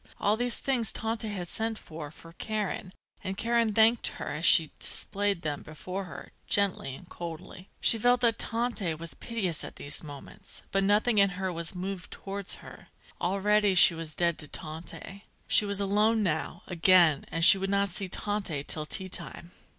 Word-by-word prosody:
All 205 Hz, +1 st, +2 dB
these 245 Hz, +1 st, -1 dB
things 245 Hz, -5 st, 0 dB
Tante 225 Hz, 0 st, -3 dB
had 190 Hz, -4 st, -5 dB
sent 225 Hz, +4 st, -2 dB
for 155 Hz, -5 st, -9 dB
for 165 Hz, +2 st, -15 dB
Karen, 210 Hz, -2 st, -4 dB, 0.3 s
and 190 Hz, 0 st, -4 dB
Karen 230 Hz, 0 st, +1 dB
thanked 225 Hz, +2 st, +4 dB
her, -, -, -5 dB
as 155 Hz, +4 st, 0 dB
she 160 Hz, -4 st, +7 dB
displayed 200 Hz, -2 st, 0 dB
them 150 Hz, -2 st, -3 dB
before 180 Hz, +5 st, -7 dB
her, 175 Hz, -, -10 dB, 0.2 s
gently 190 Hz, -10 st, +1 dB
and 175 Hz, -, -14 dB
coldly. 170 Hz, +2 st, -9 dB
She 225 Hz, -, +4 dB
felt 245 Hz, +2 st, +3 dB
that 230 Hz, -2 st, +2 dB
Tante 225 Hz, -8 st, -2 dB
was 165 Hz, +1 st, -7 dB
piteous 200 Hz, -9 st, -3 dB
at -, -, -7 dB
these 145 Hz, 0 st, -1 dB
moments, 145 Hz, -2 st, -11 dB
but 195 Hz, 0 st, +1 dB
nothing 210 Hz, +3 st, +3 dB
in 200 Hz, 0 st, +5 dB
her 190 Hz, -1 st, -2 dB
was 170 Hz, +2 st, -5 dB
moved 185 Hz, 0 st, -5 dB
towards 195 Hz, 0 st, -5 dB
her. -, -, -13 dB, 0.3 s
Already 200 Hz, +2 st, +2 dB
she 180 Hz, -, +8 dB
was 165 Hz, -2 st, -7 dB
dead 170 Hz, -1 st, +1 dB
to 150 Hz, -, -5 dB
Tante. 165 Hz, +6 st, -8 dB, 0.2 s
She 210 Hz, -, +3 dB
was 200 Hz, -1 st, -2 dB
alone 210 Hz, +3 st, +2 dB
now, 165 Hz, -1 st, -2 dB
again, 175 Hz, -4 st, +5 dB
and 165 Hz, 0 st, +2 dB
she 195 Hz, -, +9 dB
would 195 Hz, 0 st, -2 dB
not 200 Hz, 0 st, +1 dB
see 190 Hz, +2 st, -2 dB
Tante 195 Hz, -7 st, -3 dB
till 155 Hz, +1 st, +1 dB
tea 190 Hz, +4 st, +4 dB
time. 175 Hz, -1 st, -6 dB
195 Hz, 180 wpm, -28 LUFS, 170-210 Hz, 0.3 s, she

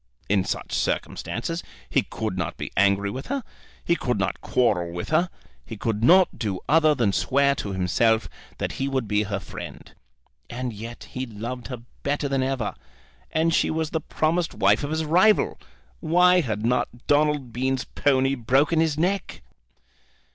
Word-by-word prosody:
In 100 Hz, -2 st, +3 dB
such -, -, -4 dB
circumstances 165 Hz, +9 st, -2 dB, 0.3 s
he -, -, +2 dB
could 110 Hz, -4 st, -4 dB
not 85 Hz, -4 st, -3 dB
be -, -, -5 dB
angry 100 Hz, 0 st, +3 dB
with 130 Hz, +5 st, -6 dB
her, 275 Hz, -1 st, -2 dB, 0.4 s
he 170 Hz, -, +3 dB
could 125 Hz, -6 st, -1 dB
not -, -, -2 dB
quarrel 90 Hz, -9 st, +1 dB
with 85 Hz, 0 st, -5 dB
her; 170 Hz, +3 st, +2 dB, 0.3 s
he 110 Hz, -, -8 dB
could 110 Hz, +1 st, -2 dB
not 185 Hz, +7 st, +5 dB
do 100 Hz, -6 st, -2 dB
other 155 Hz, -1 st, +5 dB
than 110 Hz, -7 st, +1 dB
swear 140 Hz, +4 st, +3 dB
to 105 Hz, -7 st, -4 dB
himself 110 Hz, +5 st, +2 dB, 0.3 s
that -, -, -2 dB
he 135 Hz, -, -2 dB
would 130 Hz, -4 st, -1 dB
be 105 Hz, 0 st, +2 dB
her 100 Hz, -1 st, -2 dB
friend. -, -, -9 dB, 0.6 s
And 125 Hz, -1 st, -4 dB
yet 115 Hz, +3 st, -9 dB
he 130 Hz, 0 st, -4 dB
loved 120 Hz, +3 st, -6 dB
her 125 Hz, -3 st, -7 dB, 0.2 s
better 145 Hz, 0 st, -1 dB
than 135 Hz, -1 st, 0 dB
ever; 130 Hz, -4 st, -1 dB, 0.6 s
and 160 Hz, +1 st, +2 dB
she -, -, +2 dB
was 160 Hz, -1 st, -1 dB
the 160 Hz, -, -1 dB
promised 160 Hz, +3 st, 0 dB
wife 100 Hz, +7 st, +3 dB
of 145 Hz, -, -2 dB
his 160 Hz, +1 st, -1 dB
rival! 185 Hz, +7 st, +3 dB, 0.4 s
Why 180 Hz, +2 st, +4 dB
had 110 Hz, -6 st, -3 dB
not 120 Hz, 0 st, -1 dB
Donald 145 Hz, -4 st, +2 dB
Bean's 130 Hz, +1 st, 0 dB
pony 135 Hz, -1 st, +1 dB
broken 135 Hz, +6 st, +2 dB
his 160 Hz, -2 st, +1 dB
neck? 180 Hz, -, -1 dB
130 Hz, 170 wpm, -24 LUFS, 110-155 Hz, 0.6 s, not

